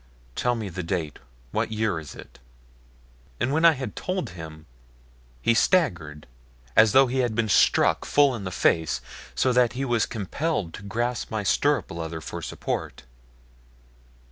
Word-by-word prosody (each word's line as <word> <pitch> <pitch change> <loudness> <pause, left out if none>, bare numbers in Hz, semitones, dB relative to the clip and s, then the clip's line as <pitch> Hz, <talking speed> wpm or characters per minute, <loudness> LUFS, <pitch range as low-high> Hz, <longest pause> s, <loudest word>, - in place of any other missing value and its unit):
Tell 125 0 +1
me 110 -3 -4
the 90 +1 -5
date. 85 -3 -3 0.3
What - - -1
year 110 -5 0
is 75 -3 -10
it?" - - -13 1.0
And 125 +3 0
when 160 +2 +1
I 165 - +8
had 130 -2 -6
told 185 - -3
him 80 -3 -10 0.8
he 115 - +4
staggered 90 - +1 0.5
as 110 -1 +6
though 135 +1 +7
he 130 +1 -2
had 120 -4 0
been 115 -1 +1
struck 95 - +3
full 145 -2 +3
in 115 -5 -5
the 90 - -3
face, 80 -3 +1 0.3
so 130 - +2
that 125 0 +3
he 135 +2 -2
was 120 -3 +1
compelled 110 - -3
to - - -8
grasp 120 +4 -3
my 110 -1 -2
stirrup 145 +8 +1
leather 80 -1 -5
for 80 - -7
support. - - -4
110 Hz, 160 wpm, -25 LUFS, 85-130 Hz, 1.0 s, I